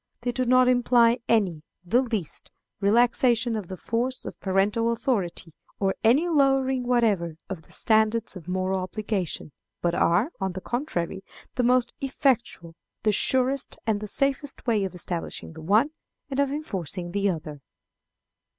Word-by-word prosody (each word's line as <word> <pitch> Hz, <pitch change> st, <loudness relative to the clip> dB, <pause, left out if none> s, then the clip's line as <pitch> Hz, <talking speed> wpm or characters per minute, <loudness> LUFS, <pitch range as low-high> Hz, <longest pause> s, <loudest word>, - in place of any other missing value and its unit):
They 245 Hz, +1 st, -1 dB
do 255 Hz, +1 st, -1 dB
not 255 Hz, +1 st, +5 dB
imply 245 Hz, -1 st, +4 dB
any, 190 Hz, -9 st, +2 dB, 0.2 s
the 235 Hz, +9 st, +3 dB
least, 220 Hz, -, -4 dB, 0.3 s
relaxation 235 Hz, +2 st, +3 dB
of 210 Hz, -5 st, -4 dB
the 185 Hz, -, -7 dB
force 245 Hz, +6 st, -2 dB
of -, -, -7 dB
parental 205 Hz, +4 st, +1 dB
authority, 220 Hz, -8 st, -2 dB, 0.3 s
or 195 Hz, -1 st, +1 dB
any 265 Hz, +10 st, +4 dB
lowering 270 Hz, -5 st, +2 dB
whatever 210 Hz, -10 st, +2 dB, 0.2 s
of 185 Hz, -4 st, -4 dB
the -, -, -22 dB
standards 220 Hz, 0 st, +2 dB
of 175 Hz, -3 st, -10 dB
moral 185 Hz, +1 st, 0 dB
obligation, 190 Hz, -4 st, -3 dB, 0.3 s
but 175 Hz, -1 st, 0 dB
are, 180 Hz, -, +2 dB
on 190 Hz, -2 st, -2 dB
the 185 Hz, -, -5 dB
contrary, 195 Hz, -, -3 dB, 0.3 s
the 250 Hz, -, 0 dB
most 245 Hz, 0 st, +2 dB
effectual, 250 Hz, -, 0 dB, 0.3 s
the 215 Hz, -, +3 dB
surest 260 Hz, +5 st, +1 dB
and 220 Hz, -2 st, +1 dB
the 210 Hz, -, -5 dB
safest 275 Hz, +4 st, -1 dB
way 220 Hz, -5 st, +2 dB
of 185 Hz, -, -6 dB
establishing 170 Hz, -2 st, -4 dB
the 160 Hz, -, -10 dB
one 215 Hz, -, +3 dB, 0.4 s
and 270 Hz, -, -2 dB
of 280 Hz, -1 st, +3 dB
enforcing 190 Hz, -, -4 dB
the 200 Hz, +1 st, +1 dB
other. 155 Hz, -4 st, -5 dB
220 Hz, 150 wpm, -26 LUFS, 185-250 Hz, 0.4 s, not